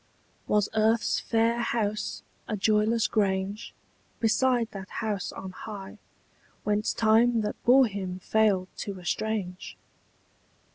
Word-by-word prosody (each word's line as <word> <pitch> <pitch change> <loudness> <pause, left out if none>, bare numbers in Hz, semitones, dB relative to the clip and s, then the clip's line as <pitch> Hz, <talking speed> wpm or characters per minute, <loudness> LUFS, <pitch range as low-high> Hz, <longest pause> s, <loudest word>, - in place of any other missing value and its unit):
Was 210 -1 +2
earth's 220 +1 +2
fair 230 +1 +1
house 215 -3 -2 0.2
a 215 - -2
joyless 215 +2 +2
grange 200 0 -1 0.5
Beside 240 +1 +2
that 195 -2 -8
house 210 -5 -3
on 190 -1 -7
high 195 0 -9 0.6
Whence 210 +1 +1
Time 225 +1 +3
that 210 0 -4
bore 260 +2 +7
him 190 -4 -4
failed 195 -2 +1
to 195 -2 -5
estrange? 185 +1 -3
215 Hz, 110 wpm, -27 LUFS, 195-225 Hz, 0.6 s, bore